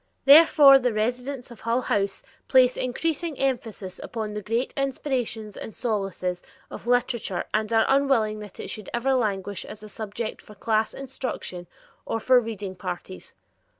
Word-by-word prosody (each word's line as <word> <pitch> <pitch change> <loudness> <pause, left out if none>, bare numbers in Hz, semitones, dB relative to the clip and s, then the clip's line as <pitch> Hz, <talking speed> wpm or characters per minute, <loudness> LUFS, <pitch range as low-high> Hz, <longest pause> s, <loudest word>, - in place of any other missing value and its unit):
Therefore 285 -1 +8
the 250 -3 0
residents 245 +4 -2
of 235 - -12
Hull 230 +2 +1
House 200 -4 -1 0.2
place 255 -2 +5
increasing 320 +4 -2
emphasis 225 -8 -2
upon 215 -2 -5
the 210 - -4
great 230 +5 -1
inspirations 255 -6 -2
and 220 - -8
solaces 195 -6 -2 0.3
of - - -9
literature 245 -6 0
and 215 +1 0
are 225 -1 +4
unwilling 270 -6 +2
that 210 -2 -11
it - - -5
should 215 -3 -6
ever 265 +3 +1
languish 205 -5 -1
as 215 - -10
a 215 - -9
subject 220 +1 -5
for 210 - -15
class 220 +1 0
instruction 255 -9 -5 0.4
or 225 - -2
for 255 +3 +5
reading 210 -5 -5
parties. 175 - -7
225 Hz, 150 wpm, -25 LUFS, 210-255 Hz, 0.4 s, Therefore